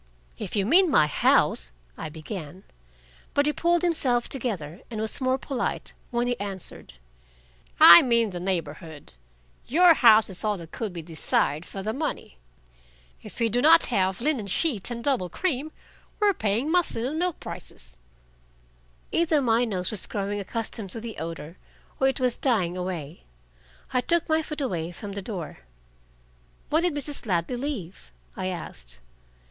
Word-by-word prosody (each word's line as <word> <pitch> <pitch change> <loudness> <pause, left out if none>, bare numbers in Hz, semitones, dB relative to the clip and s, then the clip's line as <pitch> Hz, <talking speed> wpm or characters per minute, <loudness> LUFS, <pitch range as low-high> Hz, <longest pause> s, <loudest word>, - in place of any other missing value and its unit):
"If - - -5
you 200 -2 +1
mean 355 - +5
my 205 - +5
house - - +2
" - - -34
I - - -6
began. 160 +2 -8 0.7
But 285 - +3
he - - +3
had - - -16
pulled 345 0 +2
himself 260 -8 +2
together 195 - -5
and 220 - -5
was 220 +4 -2
more 255 0 +2
polite 265 -2 -3 0.2
when 240 0 0
he 245 0 -2
answered. 195 - -6 0.9
"I 170 0 +11
mean 235 -4 +2
the 180 - -5
neighborhood. 165 - -5 0.5
Your 345 +5 +6
house 225 -6 +6
is 190 -3 -3
all 210 -2 0
that 165 -2 -10
could 225 -5 -4
be 170 -2 -7
desired 155 -1 -1
for 195 - -7
the 215 +2 -2
money. 270 - -4 0.8
If - - -11
we 230 - +3
do 240 +3 +1
not 325 +3 +7
have 190 0 +1
linen 260 -7 0
sheets 225 - -1
and 235 -1 -5
double 250 -10 0
cream, 310 - -2 0.5
we 420 -1 +4
are - - +3
paying 225 - -1
muslin 330 -10 +1
and 300 +5 -2
milk 355 -2 -1
prices." - - -10 1.2
Either 325 -2 +2
my 240 -2 +2
nose 185 -4 -3
was 215 - +5
growing 205 0 -3
accustomed 215 0 -5
to 225 - -5
the 225 -1 -7
odor, 165 0 -7 0.4
or 265 - +3
it 270 - 0
was 250 -2 +1
dying 195 -10 0
away: 180 -4 -5 0.7
I 250 - +2
took 340 +5 +1
my 315 0 +2
foot 300 -1 -6
away 175 -10 -2
from 200 +3 -8
the 200 0 -5
door. 185 -6 -6 1.1
"When 315 +2 +3
did 350 -3 0
Mrs. 290 -3 -6
Ladley 175 +5 0
leave?" 205 - -6 0.2
I 185 - -3
asked. 60 - -7
220 Hz, 165 wpm, -26 LUFS, 180-275 Hz, 1.2 s, I